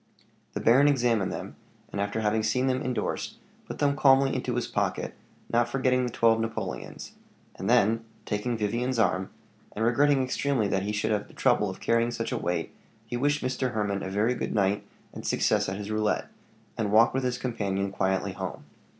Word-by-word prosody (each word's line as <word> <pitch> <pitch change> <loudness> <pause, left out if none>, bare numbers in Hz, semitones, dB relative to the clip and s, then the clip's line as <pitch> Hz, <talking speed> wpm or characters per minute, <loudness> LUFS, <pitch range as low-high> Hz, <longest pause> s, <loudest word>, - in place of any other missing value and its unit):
The - - -3
baron 130 +5 +5
examined 120 -8 +2
them, - - -6 0.3
and 100 - -2
after 100 +2 -1
having 110 +1 +1
seen 110 +4 +1
them 130 -1 +1
indorsed, 125 -1 -2 0.3
put - - -6
them 140 -1 +2
calmly 135 0 +5
into 125 -1 -2
his 120 - 0
pocket, - - -2 0.4
not 120 0 +3
forgetting 130 -1 +2
the - - -5
twelve 115 0 +3
napoleons; 115 0 -4 0.4
and - - -4
then 115 +3 +3 0.2
taking 115 +3 -1
Vivian's 120 +4 -1
arm, 95 -4 +1 0.5
and 110 - 0
regretting 135 +3 +3
extremely 130 -3 0
that 95 -1 +1
he 100 +2 -2
should 105 +1 -1
have 105 -1 0
the - - -18
trouble 105 - +2
of 95 - -7
carrying 115 0 +2
such 115 -1 -3
a - - 0
weight, 90 0 -2 0.3
he 110 - -5
wished 145 +4 +1
Mr. 130 0 -1
Hermann 100 -2 -1
a 95 - -4
very 105 +5 +1
good - - -3
night 100 0 +2 0.3
and - - -8
success - - +1
at 95 - -3
his 105 +1 -5
roulette, 110 -1 0 0.5
and 105 -2 0
walked 115 +4 +5
with 130 0 0
his 125 0 0
companion 100 -6 -2
quietly 95 -1 0
home. - - -6
115 Hz, 190 wpm, -27 LUFS, 105-125 Hz, 0.5 s, baron